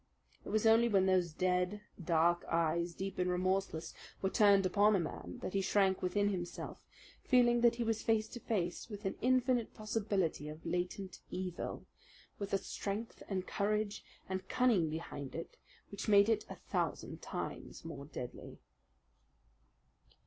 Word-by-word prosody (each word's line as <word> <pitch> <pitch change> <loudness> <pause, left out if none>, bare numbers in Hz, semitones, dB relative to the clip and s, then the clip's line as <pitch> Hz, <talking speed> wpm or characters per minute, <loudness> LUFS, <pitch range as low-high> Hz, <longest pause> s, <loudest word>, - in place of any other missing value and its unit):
It - - -8
was 215 +2 +1
only 225 +1 +6
when 195 -3 +4
those 185 -3 +3
dead, 180 +4 0 0.2
dark 170 +1 +3
eyes, 170 +1 +1
deep 195 -1 -4
and 180 0 +2
remorseless, 180 -2 0 0.3
were 190 - 0
turned 200 -3 +5
upon 205 +3 +4
a - - +3
man 120 - -5
that - - -3
he 195 - +2
shrank 190 -1 +2
within 205 +3 +1
himself, 175 -3 -5 0.4
feeling 240 -2 +4
that 235 -1 +5
he 235 - -1
was 225 -1 0
face 220 -1 +2
to 240 - -7
face 185 -3 -2
with 205 -1 -8
an 195 - 0
infinite 250 -1 +2
possibility 200 -8 -1
of 155 +2 -10
latent 180 +2 -3
evil, 180 -1 -4 0.5
with 200 -1 -4
a 195 - +3
strength 200 +3 -5
and 190 -2 -1
courage 210 +1 -1 0.2
and 190 0 -4
cunning 225 -11 +3
behind 155 -4 -6
it 165 - -6 0.4
which 200 - -5
made 200 +1 +7
it 220 -2 +1
a - - -6
thousand - - -3
times - - -6
more 160 -4 -6
deadly. 125 -4 -7
195 Hz, 155 wpm, -35 LUFS, 175-215 Hz, 0.5 s, made